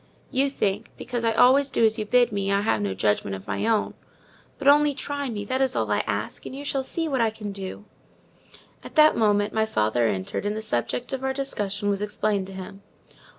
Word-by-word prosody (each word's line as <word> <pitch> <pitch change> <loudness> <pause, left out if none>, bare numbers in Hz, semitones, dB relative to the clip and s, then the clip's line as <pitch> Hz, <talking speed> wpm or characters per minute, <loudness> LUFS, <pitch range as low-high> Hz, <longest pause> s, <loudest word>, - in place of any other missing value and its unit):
"You 275 +1 +2
think, 210 -4 -2
because 240 -1 -4
I 225 -1 +2
always 270 +4 +5
do 230 - +3
as 220 +1 +2
you 215 - -2
bid 245 +1 +4
me, 200 -1 -1
I 200 0 +2
have 205 - +1
no 100 -2 -2
judgment 100 0 0
of 95 - -10
my 220 - -2
own: 225 -2 +1 0.6
but - - -3
only 290 0 +5
try 285 -1 -3
me—that 225 +4 -2
is 265 -1 +1
all 110 -2 0
I 105 - +2
ask—and 105 - -4
you 285 +1 -7
shall 275 -1 -1
see 325 +5 -2
what 270 -5 0
I 225 - +3
can 215 -1 -7
do." 195 +1 -7 1.0
At - - -11
that 310 0 +6
moment 205 -1 +2
my 220 0 +1
father 115 - +1
entered 95 - -3
and 205 +1 -2
the - - -3
subject 215 - -2
of 265 0 -3
our 265 0 0
discussion 205 -7 -3
was 200 -1 0
explained 210 -2 -1
to 195 - -9
him. 190 +1 -9
215 Hz, 215 wpm, -25 LUFS, 195-260 Hz, 1.0 s, that